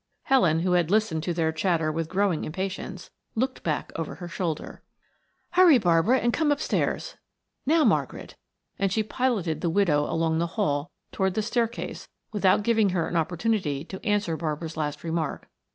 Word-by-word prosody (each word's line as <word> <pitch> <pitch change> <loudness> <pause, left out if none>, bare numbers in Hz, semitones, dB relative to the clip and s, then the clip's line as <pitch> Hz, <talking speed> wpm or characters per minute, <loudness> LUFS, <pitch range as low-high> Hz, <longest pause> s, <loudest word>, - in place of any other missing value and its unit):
Helen, 175 -12 +3
who 180 +1 0
had 175 -2 +2
listened 205 -6 +1
to 175 - -2
their 165 -2 +1
chatter 160 -1 0
with 160 0 -3
growing 190 -4 +1
impatience, 190 +2 -5 0.2
looked 255 +3 -1
back 155 -3 -2
over 165 -2 -4
her 175 - -8
shoulder. 170 -3 -4 0.7
"Hurry, 360 -5 +7
Barbara, 180 +4 +3
and 240 -2 +1
come 315 -2 +2
upstairs. 290 +1 -1 0.5
Now, 320 +1 +4
Margaret," - - 0 0.4
and 195 -1 +1
she 220 +3 +1
piloted 210 - -1
the 170 - 0
widow 160 -5 +2
along 160 0 +1
the 170 - +1
hall 145 +2 0 0.2
toward 190 -1 0
the 215 - 0
staircase 235 +1 -2 0.3
without 200 -1 +3
giving 220 -2 +3
her 175 -3 0
an - - -4
opportunity 165 -3 0
to 190 +2 -9
answer 205 -5 +1
Barbara's 160 0 -4
last 150 -2 -3
remark. 165 -1 -3
180 Hz, 165 wpm, -26 LUFS, 160-215 Hz, 0.7 s, Hurry